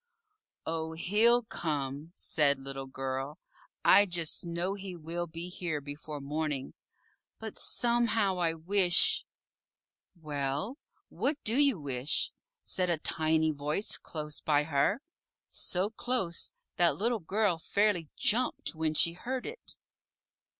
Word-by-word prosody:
"Oh, 160 Hz, 0 st, -3 dB
he'll 220 Hz, +8 st, +4 dB
come," 150 Hz, -5 st, -3 dB
said 145 Hz, -2 st, +3 dB
Little 135 Hz, 0 st, -6 dB
Girl; 135 Hz, +2 st, -4 dB, 0.5 s
"I 200 Hz, +2 st, +7 dB
just 170 Hz, -1 st, -1 dB
know 170 Hz, +3 st, -1 dB
he 195 Hz, -2 st, -6 dB
will 170 Hz, +1 st, -3 dB
be 165 Hz, +2 st, -6 dB
here 175 Hz, -4 st, -3 dB
before 145 Hz, +1 st, -7 dB
morning, 145 Hz, -1 st, -3 dB, 0.6 s
but 220 Hz, -1 st, -7 dB
somehow 230 Hz, -5 st, +1 dB
I 165 Hz, -2 st, +1 dB
wish 180 Hz, +2 st, +4 dB, 0.5 s
" -, -, -64 dB, 0.3 s
"Well, 150 Hz, -, -3 dB, 0.3 s
what 285 Hz, +2 st, -1 dB
do 225 Hz, -, +1 dB
you 280 Hz, -, +4 dB
wish?" 135 Hz, -1 st, 0 dB, 0.3 s
said 180 Hz, -1 st, +2 dB
a 170 Hz, -, +2 dB
Tiny 160 Hz, 0 st, +1 dB
Voice 150 Hz, +7 st, -2 dB
close 150 Hz, -2 st, -5 dB
by 150 Hz, -1 st, +3 dB
her 160 Hz, -, +1 dB, 0.4 s
so 190 Hz, +3 st, 0 dB
close 220 Hz, -7 st, -1 dB, 0.3 s
that 170 Hz, -4 st, +4 dB
Little 230 Hz, +2 st, +1 dB
Girl 190 Hz, 0 st, +1 dB
fairly 200 Hz, -2 st, +1 dB
jumped 240 Hz, -1 st, +1 dB
when 160 Hz, -1 st, -1 dB
she 170 Hz, +2 st, +6 dB
heard 250 Hz, +8 st, -4 dB
it. 460 Hz, +2 st, -7 dB
170 Hz, 125 wpm, -31 LUFS, 150-205 Hz, 0.6 s, I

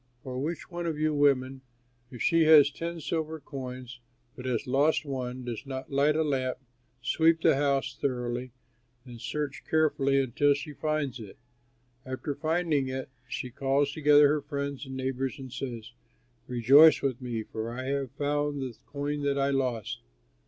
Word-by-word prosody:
"Or 130 Hz, 0 st, -4 dB
which 165 Hz, +5 st, -4 dB
one 175 Hz, 0 st, -3 dB
of 160 Hz, -2 st, -2 dB
you 155 Hz, 0 st, +1 dB
women, 135 Hz, -2 st, +2 dB, 0.5 s
if 125 Hz, -, -6 dB
she 165 Hz, -1 st, +4 dB
has 150 Hz, -2 st, +7 dB
ten 170 Hz, +3 st, -5 dB
silver 160 Hz, 0 st, -3 dB
coins 130 Hz, -3 st, -8 dB, 0.4 s
but 125 Hz, -, -9 dB
has 125 Hz, 0 st, -1 dB
lost 145 Hz, +5 st, +2 dB
one, 130 Hz, -2 st, -4 dB
does 120 Hz, -3 st, -5 dB
not 130 Hz, +2 st, -6 dB
light 140 Hz, +2 st, +3 dB
a 160 Hz, -, +2 dB
lamp, 130 Hz, -4 st, -1 dB, 0.5 s
sweep 160 Hz, +5 st, +3 dB
the -, -, +5 dB
house 140 Hz, -1 st, 0 dB
thoroughly, 125 Hz, -1 st, -2 dB, 0.5 s
and 120 Hz, -2 st, -11 dB
search 145 Hz, -3 st, -4 dB
carefully 140 Hz, -3 st, +2 dB
until 140 Hz, +2 st, +2 dB
she 145 Hz, +1 st, -6 dB
finds 150 Hz, -4 st, -2 dB
it? 105 Hz, -4 st, -10 dB, 0.7 s
After 130 Hz, +3 st, -4 dB
finding 155 Hz, -2 st, 0 dB
it 130 Hz, 0 st, -4 dB, 0.2 s
she 125 Hz, -, -4 dB
calls 140 Hz, +2 st, +1 dB
together 145 Hz, -1 st, +6 dB
her 150 Hz, +1 st, +1 dB
friends 140 Hz, -1 st, -4 dB
and 130 Hz, 0 st, -6 dB
neighbors 130 Hz, 0 st, -2 dB
and 130 Hz, -3 st, -9 dB
says, 120 Hz, -4 st, -6 dB, 0.6 s
'Rejoice 135 Hz, +6 st, +6 dB
with 135 Hz, -2 st, -1 dB
me, 120 Hz, -3 st, -3 dB
for 110 Hz, +1 st, -5 dB
I 130 Hz, +2 st, -5 dB
have 135 Hz, 0 st, -2 dB
found 145 Hz, 0 st, -1 dB
the 125 Hz, -3 st, -6 dB
coin 145 Hz, +1 st, -3 dB
that 140 Hz, -1 st, 0 dB
I 140 Hz, 0 st, +2 dB
lost.' 120 Hz, -4 st, -2 dB
140 Hz, 165 wpm, -28 LUFS, 130-150 Hz, 0.7 s, has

